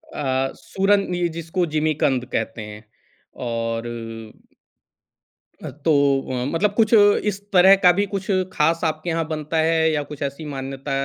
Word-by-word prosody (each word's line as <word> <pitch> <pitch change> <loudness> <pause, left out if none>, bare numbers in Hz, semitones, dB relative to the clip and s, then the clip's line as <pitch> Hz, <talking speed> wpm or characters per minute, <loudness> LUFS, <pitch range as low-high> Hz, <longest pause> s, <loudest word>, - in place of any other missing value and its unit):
अ, 135 -2 -1
सूरन 195 -1 0
ये 175 -1 0
जिसको 170 +2 -1
जिमीकंद 150 -5 +1
कहते 115 0 -2
हैं, 105 0 -9 0.5
और 115 -1 -3 1.8
अ, - - -5
तो 150 +2 -2 0.4
अ, 125 -1 -2
मतलब 200 +4 +1
कुछ 225 0 +3 0.3
इस 200 -1 -1
तरह 190 +2 +7
का 180 - +9
भी 205 - +2
कुछ 195 -1 -5 0.3
ख़ास 165 +2 +1
आपके 155 +2 -2
यहाँ 165 0 -1
बनता 155 0 -3
है 160 -1 +2
या 150 -1 -1
कुछ 145 - -9
ऐसी 140 +3 -5
मान्यता 135 0 -6
155 Hz, 145 wpm, -22 LUFS, 135-175 Hz, 1.8 s, का